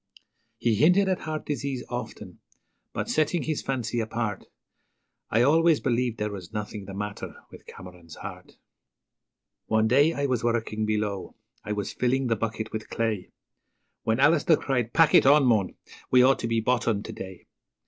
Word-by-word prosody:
He 115 Hz, -, +1 dB
hinted 180 Hz, -, +4 dB
at 185 Hz, -1 st, 0 dB
heart 155 Hz, 0 st, -5 dB
disease 140 Hz, -2 st, -3 dB
often, -, -, -7 dB, 0.5 s
but, -, -, -3 dB
setting 155 Hz, +1 st, +1 dB
his 155 Hz, +2 st, -2 dB
fancy 125 Hz, -3 st, -2 dB
apart, 110 Hz, -2 st, -3 dB, 0.8 s
I 115 Hz, +2 st, +3 dB
always 160 Hz, +3 st, +4 dB
believed 120 Hz, -2 st, 0 dB
there 105 Hz, 0 st, -2 dB
was 95 Hz, -2 st, -8 dB
nothing 105 Hz, -1 st, -5 dB
the 95 Hz, 0 st, -8 dB
matter 105 Hz, +1 st, -5 dB, 0.2 s
with -, -, -14 dB
Cameron's 90 Hz, -3 st, -12 dB
heart. -, -, -10 dB, 1.1 s
One 110 Hz, 0 st, +2 dB
day 140 Hz, +7 st, +4 dB
I 140 Hz, -2 st, -1 dB
was 125 Hz, -4 st, 0 dB
working 110 Hz, -2 st, -1 dB
below 105 Hz, -3 st, -2 dB, 0.3 s
I 105 Hz, -, -3 dB
was 105 Hz, -1 st, -4 dB
filling 130 Hz, +2 st, 0 dB
the 115 Hz, -2 st, +1 dB
bucket 110 Hz, 0 st, -4 dB
with 110 Hz, 0 st, -6 dB
clay, 110 Hz, -5 st, -2 dB, 0.7 s
When 110 Hz, +2 st, 0 dB
Alister 155 Hz, +2 st, +4 dB
cried, 125 Hz, -4 st, -1 dB
'Pack 165 Hz, +2 st, +4 dB
it -, -, +6 dB
on, 145 Hz, 0 st, +6 dB
mon! 110 Hz, -6 st, +2 dB, 0.3 s
we 125 Hz, -1 st, +6 dB
ought 135 Hz, +1 st, +4 dB
to 115 Hz, -, -2 dB
be 115 Hz, -1 st, +1 dB
bottomed 115 Hz, -3 st, 0 dB
to -, -, -6 dB
day.' 95 Hz, -1 st, -9 dB
115 Hz, 165 wpm, -26 LUFS, 105-135 Hz, 1.1 s, it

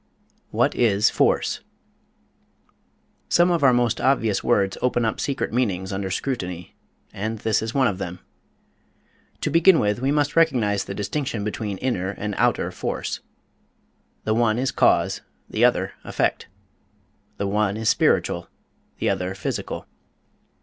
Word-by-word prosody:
What -, -, +1 dB
is 105 Hz, -3 st, +3 dB
Force? -, -, +1 dB, 1.7 s
Some 175 Hz, +1 st, +4 dB
of 170 Hz, -4 st, +1 dB
our 135 Hz, -, +7 dB
most 120 Hz, -2 st, +1 dB
obvious 115 Hz, -7 st, +2 dB
words 100 Hz, -1 st, +2 dB
open 120 Hz, -2 st, +1 dB
up 110 Hz, -, -1 dB
secret 140 Hz, -5 st, -2 dB
meanings 95 Hz, -6 st, -1 dB
under 95 Hz, 0 st, -3 dB
scrutiny, 90 Hz, -6 st, -4 dB, 0.4 s
and 110 Hz, +3 st, -3 dB
this 110 Hz, 0 st, 0 dB
is 110 Hz, 0 st, -4 dB
one 135 Hz, -1 st, +4 dB
of 100 Hz, -2 st, -2 dB
them. 90 Hz, -2 st, -5 dB, 1.2 s
To -, -, -1 dB
begin 165 Hz, +2 st, +6 dB
with, 105 Hz, -3 st, +1 dB
we 135 Hz, -, +1 dB
must 145 Hz, 0 st, +1 dB
recognize 110 Hz, -12 st, +2 dB
the 100 Hz, -, -6 dB
distinction 105 Hz, +1 st, -3 dB
between 105 Hz, -1 st, -3 dB
inner 95 Hz, -6 st, -1 dB
and 105 Hz, +1 st, -4 dB
outer -, -, +2 dB
force. -, -, -3 dB, 1.0 s
The 110 Hz, -, +1 dB
one 115 Hz, -1 st, +2 dB
is 130 Hz, +1 st, 0 dB
cause, -, -, +2 dB, 0.3 s
the -, -, -1 dB
other -, -, +3 dB
effect. -, -, -1 dB, 0.9 s
The 100 Hz, -, -2 dB
one 105 Hz, 0 st, 0 dB
is 110 Hz, 0 st, -3 dB
spiritual, -, -, +2 dB, 0.5 s
the -, -, -1 dB
other 90 Hz, +1 st, -2 dB
physical. 95 Hz, -, -4 dB
110 Hz, 140 wpm, -23 LUFS, 100-130 Hz, 1.7 s, our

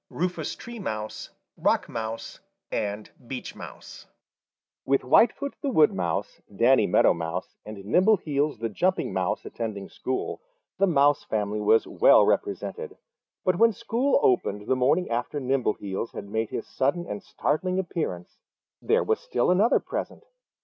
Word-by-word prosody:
CHAPTER 180 Hz, -, 0 dB, 0.2 s
XVII -, -, -4 dB
Three 235 Hz, 0 st, -9 dB
Little 110 Hz, -, -3 dB, 0.5 s
Redcoats 115 Hz, -1 st, -2 dB, 0.3 s
and 105 Hz, 0 st, -3 dB, 0.2 s
Some 130 Hz, -, -6 dB
Others -, -, -11 dB, 0.8 s
With 135 Hz, 0 st, +1 dB
Whitefoot 240 Hz, -, +3 dB
the 280 Hz, -, -1 dB
Wood 155 Hz, -, +4 dB
Mouse, 85 Hz, -3 st, -3 dB, 0.2 s
Danny 120 Hz, -2 st, +5 dB
Meadow -, -, +4 dB
Mouse 85 Hz, +2 st, -5 dB
and 105 Hz, -2 st, -9 dB
Nimbleheels 150 Hz, -, +2 dB
the 115 Hz, +1 st, -3 dB
Jumping 180 Hz, -, 0 dB
Mouse 95 Hz, -1 st, -1 dB
attending 105 Hz, -4 st, -5 dB
school, 130 Hz, -, -4 dB, 0.4 s
the 195 Hz, -, +4 dB
Mouse 145 Hz, -3 st, +3 dB
family 105 Hz, -1 st, -2 dB
was 110 Hz, +2 st, +4 dB
well -, -, +5 dB
represented, 415 Hz, +2 st, -2 dB, 0.5 s
but 185 Hz, -1 st, +2 dB
when 230 Hz, -1 st, +5 dB
school 235 Hz, +5 st, +1 dB
opened 105 Hz, -5 st, +1 dB
the 130 Hz, -, +1 dB
morning 145 Hz, +8 st, +2 dB
after 120 Hz, +5 st, -2 dB
Nimbleheels 120 Hz, -6 st, -2 dB
had 100 Hz, -, -7 dB
made 110 Hz, +2 st, -2 dB
his -, -, -4 dB
sudden 145 Hz, +7 st, -1 dB
and -, -, -5 dB
startling 185 Hz, +1 st, -1 dB
appearance, 165 Hz, -, -4 dB, 0.4 s
there -, -, +2 dB
was -, -, 0 dB
still 120 Hz, +7 st, 0 dB
another 205 Hz, +6 st, +4 dB
present. -, -, -5 dB
130 Hz, 140 wpm, -26 LUFS, -, 0.8 s, Danny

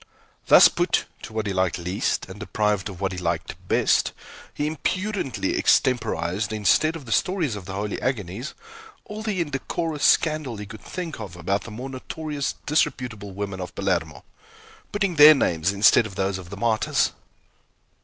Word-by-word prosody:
Thus -, -, +9 dB
put -, -, 0 dB, 0.2 s
to -, -, -9 dB
what 110 Hz, -1 st, -2 dB
he 100 Hz, -, -2 dB
liked 95 Hz, -2 st, +1 dB
least, 90 Hz, +3 st, -1 dB
and 95 Hz, +2 st, -10 dB
deprived 105 Hz, -2 st, -1 dB
of 95 Hz, -3 st, -9 dB
what 95 Hz, -1 st, -1 dB
he 90 Hz, -, -5 dB
liked 85 Hz, -1 st, -2 dB
best, -, -, +2 dB, 0.4 s
he 150 Hz, -, -3 dB
impudently 185 Hz, +1 st, -2 dB
extemporized, 105 Hz, -5 st, +1 dB
instead 110 Hz, -, +2 dB
of 155 Hz, -5 st, -8 dB
the 115 Hz, -, -8 dB
stories 165 Hz, -, +1 dB
of 95 Hz, -3 st, -8 dB
holy 100 Hz, +2 st, -4 dB
agonies, 120 Hz, -, -3 dB, 0.5 s
all 210 Hz, +1 st, -7 dB
the 210 Hz, -5 st, -1 dB
indecorous 150 Hz, +1 st, -3 dB
scandal 155 Hz, -7 st, +2 dB
he 105 Hz, -, -6 dB
could 110 Hz, 0 st, -11 dB
think 165 Hz, +2 st, -6 dB
of 100 Hz, -5 st, -7 dB
about 95 Hz, +4 st, -2 dB
the -, -, -7 dB
more 120 Hz, +5 st, -6 dB
notorious 145 Hz, +2 st, -4 dB
disreputable 125 Hz, -8 st, -1 dB
women 100 Hz, -1 st, -4 dB
of 90 Hz, -, -7 dB
Palermo, 85 Hz, -6 st, -1 dB, 0.7 s
putting 195 Hz, -5 st, -1 dB
their 150 Hz, +1 st, +10 dB
names 85 Hz, -, +1 dB
instead 105 Hz, +3 st, +5 dB
of 100 Hz, -, -12 dB
those 95 Hz, 0 st, -1 dB
of 90 Hz, -2 st, -11 dB
the 100 Hz, -, -8 dB
martyrs. 110 Hz, 0 st, +1 dB
110 Hz, 165 wpm, -24 LUFS, 95-150 Hz, 0.7 s, their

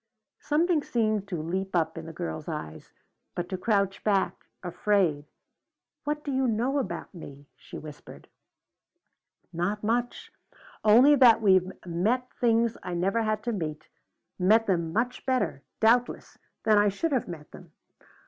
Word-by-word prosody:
Something 320 Hz, +1 st, +1 dB
seemed 215 Hz, -6 st, -1 dB
to 180 Hz, -4 st, -4 dB
leap 190 Hz, +3 st, -3 dB
up 160 Hz, -2 st, +1 dB
in 165 Hz, 0 st, -7 dB
the -, -, -7 dB
girl's 160 Hz, -2 st, -6 dB
eyes, 80 Hz, -, -7 dB, 0.4 s
but 175 Hz, 0 st, -3 dB
to 190 Hz, -, -3 dB
crouch 200 Hz, 0 st, 0 dB
back, 200 Hz, -3 st, 0 dB, 0.2 s
afraid. 175 Hz, -4 st, 0 dB, 0.8 s
"What 295 Hz, 0 st, -2 dB
do 285 Hz, -, -3 dB
you 265 Hz, -1 st, +1 dB
know 245 Hz, +5 st, 0 dB
about 170 Hz, -10 st, -5 dB
me?" 145 Hz, -5 st, -11 dB
she -, -, -11 dB
whispered. 150 Hz, -1 st, -11 dB, 1.3 s
"Not 185 Hz, +6 st, -2 dB
much. 240 Hz, +3 st, -2 dB, 0.5 s
Only 240 Hz, +7 st, +7 dB
that 235 Hz, -4 st, +6 dB
you've 190 Hz, -2 st, +4 dB
met 215 Hz, +9 st, -1 dB
things 230 Hz, -1 st, +1 dB
I 180 Hz, -, -5 dB
never 195 Hz, +6 st, 0 dB
had 215 Hz, -1 st, -1 dB
to 240 Hz, -, -1 dB
meet, 155 Hz, -7 st, -5 dB, 0.5 s
met 215 Hz, +5 st, +4 dB
them 170 Hz, -5 st, 0 dB
much 240 Hz, +6 st, -1 dB
better, 205 Hz, -, 0 dB, 0.2 s
doubtless, 240 Hz, +2 st, +2 dB, 0.3 s
than 215 Hz, -2 st, +4 dB
I 205 Hz, 0 st, +4 dB
should 295 Hz, +12 st, -2 dB
have 260 Hz, -5 st, 0 dB
met 160 Hz, -4 st, -9 dB
them. -, -, -14 dB
205 Hz, 150 wpm, -27 LUFS, 175-235 Hz, 1.3 s, Only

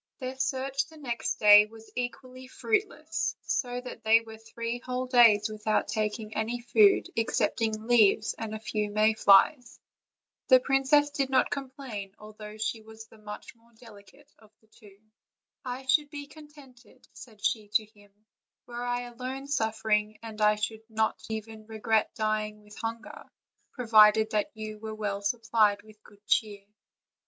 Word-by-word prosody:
Their 255 Hz, -1 st, -6 dB
search 270 Hz, +1 st, -1 dB
the 320 Hz, 0 st, -16 dB
next 240 Hz, -6 st, -3 dB
day 210 Hz, 0 st, +7 dB
was 225 Hz, 0 st, -16 dB
equally 255 Hz, +1 st, -6 dB
fruitless; 330 Hz, -, -2 dB
so 245 Hz, -2 st, -2 dB
that 250 Hz, -, -10 dB
they 225 Hz, +1 st, +5 dB
were 220 Hz, -1 st, -12 dB
three 230 Hz, +1 st, -5 dB
whole 250 Hz, +1 st, -4 dB
days 230 Hz, -5 st, +5 dB
without 215 Hz, 0 st, -1 dB
taking 215 Hz, 0 st, -3 dB
any 225 Hz, +3 st, -2 dB
food 220 Hz, -4 st, +4 dB
excepting 220 Hz, -1 st, -1 dB
leaves, 220 Hz, -2 st, +3 dB
and 220 Hz, -1 st, -5 dB
a -, -, -6 dB
few 210 Hz, -1 st, -3 dB
may 215 Hz, +1 st, +3 dB
flies. 220 Hz, +5 st, +4 dB, 0.7 s
The 255 Hz, -1 st, +7 dB
princess 270 Hz, +2 st, +2 dB
did 275 Hz, -2 st, -1 dB
not 260 Hz, -1 st, +2 dB
complain, 260 Hz, -8 st, -6 dB
although 215 Hz, 0 st, -11 dB
she 220 Hz, +1 st, -3 dB
was 220 Hz, 0 st, -13 dB
much 215 Hz, -1 st, -10 dB
the 230 Hz, -, -32 dB
more 235 Hz, +1 st, -28 dB
delicate 225 Hz, +5 st, -17 dB
of 215 Hz, -, -20 dB
the -, -, -29 dB
two. 205 Hz, -3 st, -19 dB, 0.7 s
"I 255 Hz, +1 st, -6 dB
should 290 Hz, +3 st, +2 dB
be 290 Hz, -1 st, -7 dB
contented," 290 Hz, -4 st, -17 dB
said 215 Hz, -5 st, -11 dB
she 215 Hz, -2 st, 0 dB
to 215 Hz, -, +3 dB
him, 205 Hz, -1 st, -22 dB, 0.5 s
"were 240 Hz, 0 st, -6 dB
I 245 Hz, 0 st, -1 dB
alone 255 Hz, +3 st, -7 dB
suffering, 220 Hz, -5 st, -1 dB
and 220 Hz, -1 st, -8 dB
I 210 Hz, 0 st, +4 dB
should 220 Hz, +1 st, -4 dB
not 220 Hz, 0 st, -1 dB
even 220 Hz, 0 st, -7 dB
regret 220 Hz, 0 st, 0 dB
dying 215 Hz, -1 st, -2 dB
with 210 Hz, 0 st, -15 dB
hunger, 225 Hz, 0 st, -7 dB, 0.5 s
provided 220 Hz, -2 st, +5 dB
that 210 Hz, -1 st, 0 dB
you 215 Hz, -1 st, -7 dB
were 220 Hz, 0 st, -7 dB
well 205 Hz, -2 st, -3 dB
supplied 215 Hz, -1 st, +1 dB
with 215 Hz, -1 st, -18 dB
good 205 Hz, 0 st, -21 dB
cheer." 205 Hz, -3 st, 0 dB
225 Hz, 155 wpm, -28 LUFS, 215-250 Hz, 0.7 s, day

